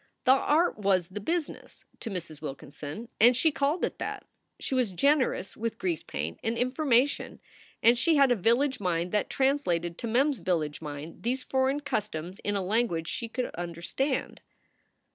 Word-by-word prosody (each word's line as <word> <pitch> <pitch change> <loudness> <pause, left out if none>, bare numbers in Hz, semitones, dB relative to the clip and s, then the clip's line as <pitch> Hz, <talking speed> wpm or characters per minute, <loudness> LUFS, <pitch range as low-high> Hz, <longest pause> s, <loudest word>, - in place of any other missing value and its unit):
The 255 - +5
art 300 +3 +3
was 190 -3 +2
"the 195 +2 -5
business" 325 +9 -4
to - - -5
Mrs. 170 -6 -6
Wilkinson, 150 - -7
and 240 +2 +6
she 315 +5 +3
called 290 +4 +1
it - - -6
that. - - -4 0.3
She - - -4
was 250 -7 +1
generous 275 - +2
with 230 0 -3
grease 175 -4 -1
paint 75 +3 -5
and 225 +1 -1
information, 255 +1 +1 0.4
and 235 +1 +7
she 320 +7 +3
had 275 -3 +5
a - - +5
village 250 +6 +2
mind 175 -2 -1
that 210 - 0
translated 180 - 0
to 235 - -3
Mem 255 +6 +3
s 280 - -3
village 160 -5 -1
mind 150 +1 -7
these 255 +3 -1
foreign 265 +2 +1
customs 190 - -3
in 205 - -2
a 195 - 0
language 185 -5 0
she 235 - -4
could 250 +2 -3
understand. 175 - -3
230 Hz, 170 wpm, -28 LUFS, 175-265 Hz, 0.4 s, and